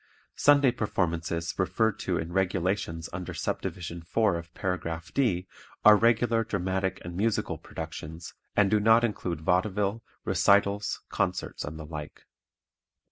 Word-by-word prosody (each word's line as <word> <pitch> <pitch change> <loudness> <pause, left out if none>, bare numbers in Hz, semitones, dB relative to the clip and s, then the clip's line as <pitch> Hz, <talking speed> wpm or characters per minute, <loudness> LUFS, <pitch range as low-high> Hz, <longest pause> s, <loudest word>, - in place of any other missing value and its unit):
Sunday 145 -3 +5
performances 85 -6 -1
referred 100 +3 +1
to 90 -2 -1
in 80 +2 -4
"Regulations" 90 -3 0
under 90 0 -5
Subdivision 85 -2 -4
4 100 +3 +1
of 85 0 -6
Paragraph 85 -3 -3
D 100 -10 +1 0.4
are 105 0 +10
regular 115 +1 +3
dramatic 95 -2 -1
and 85 0 -6
musical 110 +3 0
productions 80 0 -7 0.2
and 100 -2 +4
do 105 - +4
not 115 +3 +5
include 90 -8 -2
vaudeville, 100 +5 +1 0.2
recitals, 100 +1 +2
concerts - - -2
and 75 +2 -6
the 75 - -7
like. 75 -1 -8
95 Hz, 130 wpm, -28 LUFS, 85-105 Hz, 0.4 s, are